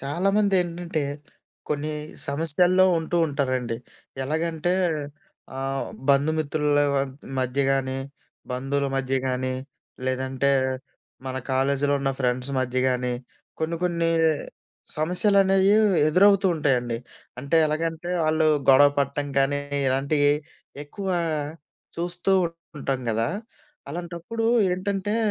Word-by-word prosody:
చాలామందేంటంటే, 175 0 0 0.7
కొన్ని 150 +1 -1 0.4
సమస్యల్లో 165 +5 +3
ఉంటూ 160 +2 -2
ఉంటారండి. 130 -4 -1 0.5
ఎలాగంటే 160 +4 -1 0.8
ఆహ్, 135 0 -2 0.2
బంధు 140 +2 +4
మిత్రులవ 145 -1 +1 0.4
మధ్య 130 +1 0
గానీ, 130 -1 -1 0.5
బంధువుల 135 +2 -1
మధ్య 135 0 -1
గాని 130 0 -1 0.5
లేదంటే 130 +1 0 0.8
మన 130 0 -3 0.2
కాలేజులో 140 +2 +1
ఉన్న 135 0 0
ఫ్రెండ్స్ 125 0 -1
మధ్య 130 0 -1
గానీ, 125 -1 0 0.5
కొన్ని 160 +1 -1
కొన్ని 170 -2 +1 0.9
సమస్యలనేవి 195 +4 +3 0.4
ఎదురవుతూ 195 +4 +5
ఉంటాయండి. 125 -6 0 0.4
అంటే 140 +5 0
ఎలాగంటే 165 +2 -2 0.2
ఆళ్ళు 155 0 +2 0.2
గొడవ 140 +2 +7
పటం 140 +1 0
కానీ 145 +1 +2 0.3
ఇలాంటియి 140 +2 +2 0.5
ఎక్కువ 190 +7 -6 0.9
చూస్తూ 175 +2 -1 0.5
ఉంటాం 135 -2 -2
గదా. 115 +1 0 0.6
అలాంటప్పుడు 175 +7 -5 0.3
ఏంటంటే, 195 +3 -1
145 Hz, 90 wpm, -25 LUFS, 135-175 Hz, 0.9 s, గొడవ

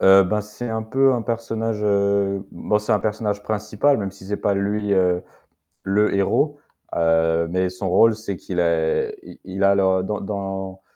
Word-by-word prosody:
Heu, 95 0 +7
ben, 105 +3 0
c'est 105 +3 -7
un 110 0 -2
peu 135 +4 +3
un 120 -2 -1
personnage, 115 -1 -3
heu, 100 -1 +1
bon 105 - 0
c'est 105 - -1
un - - +4
personnage 105 -1 -2
principal 110 +6 +1
même 100 -2 -3
si 95 0 -14
c'est 105 - -2
pas 100 - 0
lui, 100 +1 -1
heu, 90 -2 +2 0.6
le 105 +2 +2
héros 145 +9 +1 0.4
mais 85 +2 +2
son 90 +1 -4
rôle 110 +4 +5
c'est 100 -4 -5
qu'il 90 +1 -4
est 80 -2 +1
il - - -13
il 95 +1 -4
a 100 0 +5
dans 95 +1 +1
dans 95 -1 -5
100 Hz, 175 wpm, -22 LUFS, 95-105 Hz, 0.6 s, Heu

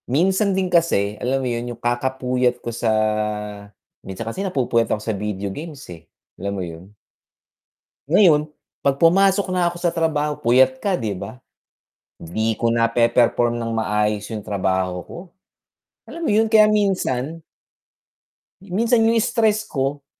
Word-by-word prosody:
Minsan 190 - +2
din 185 -2 -1
kasi, 135 - +2
alam 130 +1 -1
mo - - 0
yun, 120 0 -3
yung 120 - -7
kakapuyat 125 0 0
ko 120 -1 -6
sa 115 0 -1 1.1
minsan 95 +4 -7
kasi 115 +12 -4
napupuyat 125 - 0
ako - - +1
sa 110 - -2
video 100 -1 -4
games 150 -1 -8
eh, 85 0 -16 0.3
alam 100 +1 -3
mo 95 - -3
yun? 85 +4 -11 1.2
Ngayon, 155 -4 +4 0.3
'pag 140 -1 +1
pumasok 195 +5 +4
na 180 -1 +2
ako 175 - -9
sa 175 -1 -1
trabaho 150 -2 0
puyat 130 +1 +3
ka 195 -3 0
di 110 -7 -3
ba? 100 +6 -8 0.8
Di 110 +7 -1
ko 115 +2 0
nape-perform 120 +1 +2
ng 115 -1 -3
maayos 105 -1 -1
yung 105 -2 -6
trabaho 95 -3 -1
ko, - - -11 0.9
alam 335 - -10
mo - - +1
yun 220 +1 +2
kaya 215 -1 +7
minsan 165 -8 0 1.2
minsan 225 +5 +1
yung 225 +1 +3
stress 220 -2 +1
ko, 140 -3 -3
130 Hz, 145 wpm, -21 LUFS, 110-175 Hz, 1.2 s, kaya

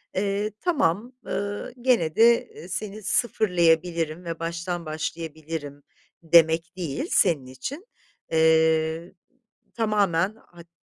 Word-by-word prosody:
eee, 200 +2 -1
tamam, 255 - 0
ııı, 205 +3 -4
gene 230 -12 +2
de, 235 +1 +5
eee, 175 - -12
seni 205 +2 -5
sıfırlayabilirim 170 -7 +1
ve 165 -1 -5
baştan 170 +1 -4
başlayabilirim 155 -2 -5 0.4
demek 165 +1 +4
değil 175 - -3
senin 160 -9 +3
için. 255 - -7 0.5
Eee, 160 +1 +2 0.6
tamamen 205 -4 +1
hat 175 -6 -17
170 Hz, 100 wpm, -25 LUFS, 160-205 Hz, 0.6 s, de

